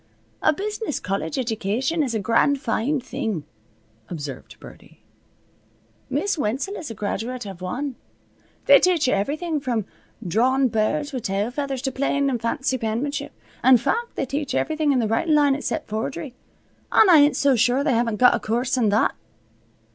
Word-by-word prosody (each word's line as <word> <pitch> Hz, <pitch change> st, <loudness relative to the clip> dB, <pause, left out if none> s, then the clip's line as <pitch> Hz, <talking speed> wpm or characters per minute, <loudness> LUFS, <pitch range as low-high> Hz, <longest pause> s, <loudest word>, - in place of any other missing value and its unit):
"A -, -, +4 dB
business 415 Hz, -, -3 dB
college 185 Hz, -4 st, -3 dB
edjication 250 Hz, -, -1 dB
is 245 Hz, -5 st, -2 dB
a -, -, 0 dB
grand 230 Hz, +7 st, +2 dB
foine 265 Hz, +2 st, 0 dB
thing," 245 Hz, -, -4 dB, 0.7 s
observed 145 Hz, -6 st, -7 dB
Birdie. -, -, -15 dB, 1.1 s
"Miss 405 Hz, -5 st, -1 dB
Wenzel 270 Hz, -, -1 dB
is 325 Hz, -, -6 dB
a 225 Hz, -, -7 dB
graduate 225 Hz, +4 st, -4 dB
av 190 Hz, -3 st, -9 dB
wan. 260 Hz, +10 st, -3 dB, 0.7 s
They -, -, +8 dB
teach 350 Hz, -6 st, +2 dB
you -, -, +2 dB
everything 300 Hz, -, -1 dB
from 240 Hz, -6 st, -2 dB, 0.4 s
drawin' 255 Hz, +7 st, +2 dB
birds 285 Hz, +8 st, -1 dB
with 255 Hz, -, -3 dB
tail 200 Hz, +3 st, -1 dB
feathers 270 Hz, -1 st, -3 dB
to 265 Hz, -, -1 dB
plain 280 Hz, +1 st, 0 dB
and 240 Hz, -3 st, -2 dB
fancy 260 Hz, +2 st, -1 dB
penmanship. 235 Hz, +6 st, -3 dB, 0.3 s
In 260 Hz, -1 st, +7 dB
fact, 470 Hz, -, -2 dB
they -, -, -1 dB
teach 280 Hz, +2 st, -3 dB
everything 310 Hz, -2 st, +1 dB
in 270 Hz, -, +2 dB
the 230 Hz, -3 st, +1 dB
writin' 300 Hz, +9 st, +1 dB
line 290 Hz, -2 st, +4 dB
except 270 Hz, -2 st, -3 dB
forgery, 210 Hz, -, -4 dB, 0.6 s
an' 435 Hz, -, +6 dB
I 350 Hz, -3 st, +8 dB
ain't 290 Hz, +1 st, +4 dB
so 280 Hz, -2 st, +3 dB
sure 245 Hz, +4 st, +2 dB
they 285 Hz, -3 st, +2 dB
haven't 230 Hz, -1 st, +1 dB
got 250 Hz, +3 st, +5 dB
a -, -, 0 dB
coorse 245 Hz, +4 st, -1 dB
in 225 Hz, -4 st, +2 dB
that." 210 Hz, +2 st, +2 dB
255 Hz, 170 wpm, -23 LUFS, 220-285 Hz, 1.1 s, They